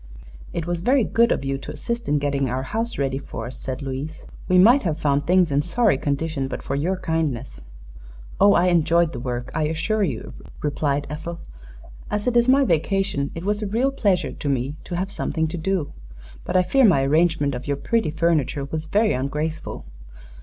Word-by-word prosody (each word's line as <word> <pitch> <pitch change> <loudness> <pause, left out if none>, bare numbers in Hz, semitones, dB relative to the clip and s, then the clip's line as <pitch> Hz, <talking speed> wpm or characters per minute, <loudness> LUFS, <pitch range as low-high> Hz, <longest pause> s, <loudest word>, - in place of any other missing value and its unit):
"It 170 -2 -3
was 175 -1 -2
very 255 +5 +3
good 230 +2 +3
of - - 0
you 135 0 -2
to - - -7
assist 235 +10 -4
in 150 - +3
getting 140 -2 0
our 130 +2 -2
house 225 - -3
ready 135 -1 -1
for 115 -4 -7
us," 125 0 -7
said 130 +1 -5
Louise. 140 +4 -5 0.2
"We 185 - +4
might 235 +9 +7
have 160 -5 -1
found 145 0 0
things 180 -3 +4
in 140 +1 +3
sorry 185 - +2
condition 145 -1 -1
but - - -6
for - - -3
your 170 +7 0
kindness." 160 - -2 0.8
"Oh, 200 +1 +6
I 180 +1 +4
enjoyed 170 -1 +3
the 125 - -5
work, 125 0 -4
I 155 -1 0
assure 160 +8 -1
you," 140 - -2 0.3
replied 145 -1 0
Ethel. 165 +3 -5 0.7
"As 210 0 -2
it 250 -1 0
is 240 +1 +4
my 275 +2 +6
vacation, 185 - 0
it 165 +2 -6
was 205 +1 0
a 210 - -2
real 240 +7 +1
pleasure 200 -9 +1
to 145 - -4
me 135 +1 -1
to 175 - -4
have 190 +3 -2
something 160 -4 -1
to 175 - -4
do. 180 -3 -1 0.5
But - - +1
I 180 - +4
fear 270 +8 +3
my 170 - +5
arrangement 155 0 +2
of 125 +2 -6
your 140 -1 0
pretty 225 +2 0
furniture 150 -4 0
was 155 +3 -4
very 210 +4 +2
ungraceful." 150 +5 -3
160 Hz, 200 wpm, -23 LUFS, 140-195 Hz, 0.8 s, might